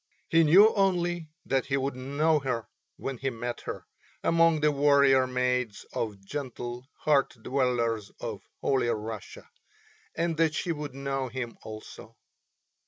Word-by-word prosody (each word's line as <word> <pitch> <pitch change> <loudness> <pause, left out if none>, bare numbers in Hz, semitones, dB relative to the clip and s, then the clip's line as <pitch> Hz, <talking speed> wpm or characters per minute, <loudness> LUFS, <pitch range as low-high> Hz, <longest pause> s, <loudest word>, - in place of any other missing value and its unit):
He 165 0 +5
knew 195 +8 +7
only 175 -4 +1 0.2
that 135 -1 0
he 135 0 +1
would 135 0 -1
know 145 +5 +1
her 125 -5 -2 0.3
when 135 -3 -5
he 135 - 0
met 120 0 -5
her - - -5 0.4
among 165 -2 +4
the 150 0 +4
warrior 140 -2 +5
maids 125 -3 -1
or 110 -3 -2
gentle 120 +3 -6
hearth 140 -4 +2
dwellers 120 -5 0
of - - -5 0.2
Holy 135 -3 +2
Russia, 110 -1 -5 0.7
and 165 -1 0
that 160 -1 +2
she 175 - -1
would 150 -3 -5
know 135 -1 -2
him 120 -2 -5
also. 110 0 -10
135 Hz, 140 wpm, -28 LUFS, 120-150 Hz, 0.7 s, knew